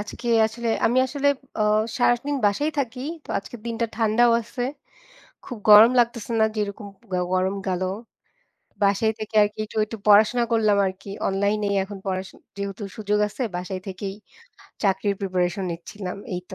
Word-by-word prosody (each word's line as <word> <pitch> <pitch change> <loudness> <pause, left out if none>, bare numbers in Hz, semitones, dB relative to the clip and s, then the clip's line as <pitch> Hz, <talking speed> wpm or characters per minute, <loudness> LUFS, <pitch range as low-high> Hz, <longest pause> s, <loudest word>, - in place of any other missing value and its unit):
আজকে 235 +3 -6 0.2
আসলে 235 +1 -5 0.2
আমি 245 +3 +2
আসলে 285 +2 0 0.3
অ 215 - +2 0.4
সারাদিন 245 +4 +2
বাসায় 290 +10 +1
থাকি, 250 -2 -2 0.2
তো - - -22
আজকের 215 +4 -10
দিনটা 230 0 -1
ঠান্ডাও 230 +1 +3
আছে, 245 +2 -6 0.8
খুব 245 - -7
গরম 215 +3 +10
লাগতেছে 235 -1 +1
না 220 - +6
যেরকম 205 0 -3 0.3
গো 180 - +1 0.2
গরম 185 +1 +1
গেলো। 185 -1 -1 1.0
বাসায় 200 +3 +3
থেকে 215 0 -7
আরকি 205 +1 -3
একটু, 215 - -10
একটু 225 +1 -7
পড়াশোনা 215 +4 +6
করলাম 215 -3 +3
আরকি 190 +1 -8 0.2
অনলাইনেই 200 +1 0
এখন 200 +1 -8
পড়া 185 -1 -1 0.4
যেহেতু 200 +1 -5
সুযোগ 210 -1 0
আছে 210 +5 -8
বাসায় 185 +1 -4
থেকেই 195 +1 -5 0.7
চাকরির 200 0 +1
প্রিপারেশন 185 0 -1
নিচ্ছিলাম 180 +2 -7 0.2
এই 180 - -3
তো। - - -7
210 Hz, 150 wpm, -24 LUFS, 195-235 Hz, 1.0 s, গরম